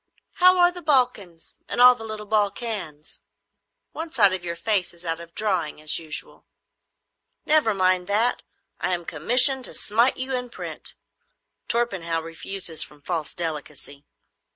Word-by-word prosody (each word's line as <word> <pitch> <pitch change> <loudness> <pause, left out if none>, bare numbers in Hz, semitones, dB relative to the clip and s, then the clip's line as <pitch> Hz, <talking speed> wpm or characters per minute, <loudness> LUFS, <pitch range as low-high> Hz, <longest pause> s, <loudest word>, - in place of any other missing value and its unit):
How 365 0 +6
are 350 0 +5
the 355 0 -7
Balkans 245 - -1
and - - -4
all 250 0 +9
the 235 -2 -10
little 215 -1 -6
Balkans? 205 -7 -3 0.7
One 325 0 -6
side 205 -9 +5
of 185 -2 -3
your 170 -1 -4
face 195 -2 -1
is 170 +1 -15
out 165 0 -2
of 170 0 -13
drawing, 185 -9 -1
as 155 0 -1
usual." 155 -2 -7 1.0
"Never 295 -9 +4
mind 185 -1 +1
that. 220 +4 +1 0.4
I 185 - 0
am 175 -1 -8
commissioned 250 - +4
to - - -8
smite 230 +5 +1
you 260 +1 -3
in 250 -1 -4
print. - - -7 0.7
Torpenhow 190 -9 -1
refuses 165 +1 -5
from 145 -1 -7
false 165 -3 -4
delicacy. 150 -4 -6
195 Hz, 150 wpm, -24 LUFS, 165-245 Hz, 1.0 s, all